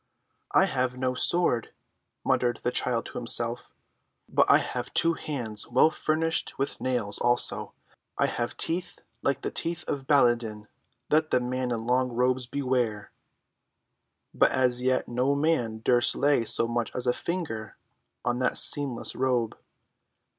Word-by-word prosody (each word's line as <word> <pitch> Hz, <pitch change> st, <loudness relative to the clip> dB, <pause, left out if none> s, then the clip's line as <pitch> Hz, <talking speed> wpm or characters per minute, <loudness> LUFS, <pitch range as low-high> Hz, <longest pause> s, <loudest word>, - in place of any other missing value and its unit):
"I -, -, +5 dB
have 125 Hz, -1 st, -1 dB
no 130 Hz, 0 st, -1 dB
sword," 125 Hz, -3 st, 0 dB, 0.5 s
muttered 120 Hz, -2 st, +1 dB
the 125 Hz, -, 0 dB
child 120 Hz, -2 st, 0 dB
to -, -, -6 dB
himself, 120 Hz, 0 st, 0 dB, 0.6 s
"but -, -, +2 dB
I -, -, +8 dB
have 125 Hz, 0 st, -4 dB
two 165 Hz, 0 st, +4 dB
hands 120 Hz, -10 st, -3 dB
well 160 Hz, -, +4 dB
furnished 160 Hz, +1 st, -1 dB
with 135 Hz, -, -3 dB
nails, 120 Hz, -6 st, -1 dB
also, 120 Hz, 0 st, +1 dB, 0.4 s
I -, -, +2 dB
have 120 Hz, -, -3 dB
teeth 180 Hz, +2 st, +1 dB, 0.2 s
like 140 Hz, -1 st, 0 dB
the -, -, -3 dB
teeth 170 Hz, 0 st, -2 dB
of 135 Hz, -2 st, -4 dB
Baladan. 120 Hz, -6 st, +2 dB, 0.4 s
Let 155 Hz, +1 st, +3 dB
the -, -, +3 dB
men 125 Hz, 0 st, -2 dB
in 115 Hz, -2 st, -3 dB
long 125 Hz, +1 st, +1 dB
robes 125 Hz, +1 st, +1 dB
beware." 125 Hz, -5 st, -2 dB, 1.2 s
But -, -, +4 dB
as 125 Hz, -1 st, +1 dB
yet 130 Hz, 0 st, 0 dB
no 125 Hz, +4 st, 0 dB
man 125 Hz, -8 st, 0 dB
durst 120 Hz, -1 st, +3 dB
lay 140 Hz, -5 st, +2 dB
so 115 Hz, -, +3 dB
much 120 Hz, 0 st, -1 dB
as 125 Hz, -, -1 dB
a 125 Hz, -, +2 dB
finger 125 Hz, -, -5 dB, 0.5 s
on 120 Hz, 0 st, 0 dB
that 130 Hz, -, +1 dB
seamless 140 Hz, -5 st, 0 dB
robe. 125 Hz, -4 st, 0 dB
125 Hz, 145 wpm, -27 LUFS, 120-140 Hz, 1.2 s, I